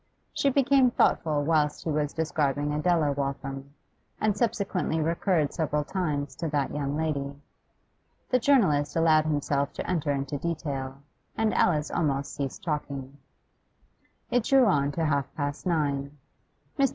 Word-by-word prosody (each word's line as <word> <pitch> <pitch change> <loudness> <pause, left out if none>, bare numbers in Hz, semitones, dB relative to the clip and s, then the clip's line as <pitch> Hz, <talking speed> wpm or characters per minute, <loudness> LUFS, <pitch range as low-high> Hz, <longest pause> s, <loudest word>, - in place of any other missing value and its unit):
She 280 - +2
became 275 -1 +4
thoughtful 155 -10 +2
whilst 150 -1 +1
he 160 - -2
was 150 -1 0
describing 150 -2 -1
Adela 155 -1 +2
Waltham, 140 0 -4 0.4
and 215 -2 +1
subsequently 200 -7 -1
recurred 165 -1 +1
several 150 -2 0
times 145 -5 -2
to 165 - -2
that 145 -3 -1
young 145 0 -2
lady. 140 -3 -2 1.0
The 255 - +4
journalist 190 - +3
allowed 160 -2 +4
himself 145 -2 0
to - - -5
enter 160 -5 0
into 140 0 -2
detail, 140 -5 -4 0.3
and 220 -1 +1
Alice 155 -3 +2
almost 140 -3 -1
ceased 135 -2 -5
talking. 140 -3 -4 1.1
It 245 -2 +2
drew 270 -2 +5
on 145 -8 +2
to 165 +1 -1
half 140 -3 0
past 145 +4 -3
nine. 145 -4 -1 0.6
Mr. 275 -1 +4
150 Hz, 140 wpm, -27 LUFS, 140-170 Hz, 1.1 s, drew